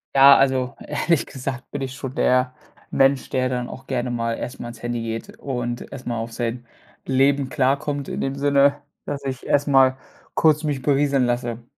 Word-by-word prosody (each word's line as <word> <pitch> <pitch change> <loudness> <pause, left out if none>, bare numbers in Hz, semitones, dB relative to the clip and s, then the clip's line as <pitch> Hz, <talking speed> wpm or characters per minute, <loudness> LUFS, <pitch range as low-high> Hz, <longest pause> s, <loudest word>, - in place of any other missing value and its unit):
Ja, 135 0 +9
also 130 -1 +1
ehrlich 155 +2 0
gesagt 130 -1 -6
bin 145 - -4
ich 130 0 -4
schon 130 -2 -6
der 125 0 +2 0.4
Mensch, 135 0 +2
der 130 0 +1
dann 125 -1 -2
auch 130 - -10
gerne 125 -2 -1
mal 115 -1 -1
erst 125 - -6
mal 120 - -5
ans 120 -1 -10
Handy 120 -1 -2
geht 115 0 -6
und 120 -3 -4
erst 130 - -9
mal 120 -1 -2
auf 115 +1 -5
sein 120 0 -4 0.4
Leben 135 +1 +2
klarkommt, 140 0 0
in - - -3
dem 135 0 -2
Sinne, 140 0 +3 0.3
dass 140 -1 -4
ich 130 -1 -4
erst 145 +1 +2
mal 130 -1 +5 0.4
kurz 155 -1 +3
mich 145 -4 -2
berieseln 140 -2 +2
lasse. 120 -1 -2
130 Hz, 190 wpm, -22 LUFS, 120-140 Hz, 0.4 s, Ja